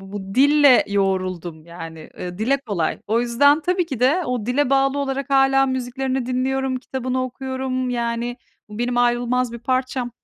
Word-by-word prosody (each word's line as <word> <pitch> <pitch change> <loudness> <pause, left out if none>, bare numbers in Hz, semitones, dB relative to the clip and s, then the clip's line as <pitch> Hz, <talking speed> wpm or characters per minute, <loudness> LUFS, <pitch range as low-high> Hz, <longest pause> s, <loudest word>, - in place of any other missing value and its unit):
b 195 - -13
bu 195 -1 -6
dille 285 -1 +6
yoğruldum. 185 -5 -2
Yani, 165 -2 -9
ııı, 180 +1 -6
dile 260 +6 +2
kolay. 205 -12 -2
O 225 +3 +1
yüzden 285 +6 +3
tabii 360 +2 0
ki 265 -7 -5
de 285 +9 +3
o 245 -3 -3
dile 265 +2 +1
bağlı 275 +1 +2
olarak 275 0 -3
hâlâ 270 0 +4
müziklerini 260 0 -2
dinliyorum, 260 +1 -1
kitabını 255 0 -3
okuyorum. 260 0 -3
Yani, 235 0 -2 0.3
bu 210 +1 -9
benim 240 0 -1
ayrılmaz 245 0 +1
bir 235 - -6
parçam. 255 0 -1
250 Hz, 165 wpm, -21 LUFS, 235-270 Hz, 0.3 s, dille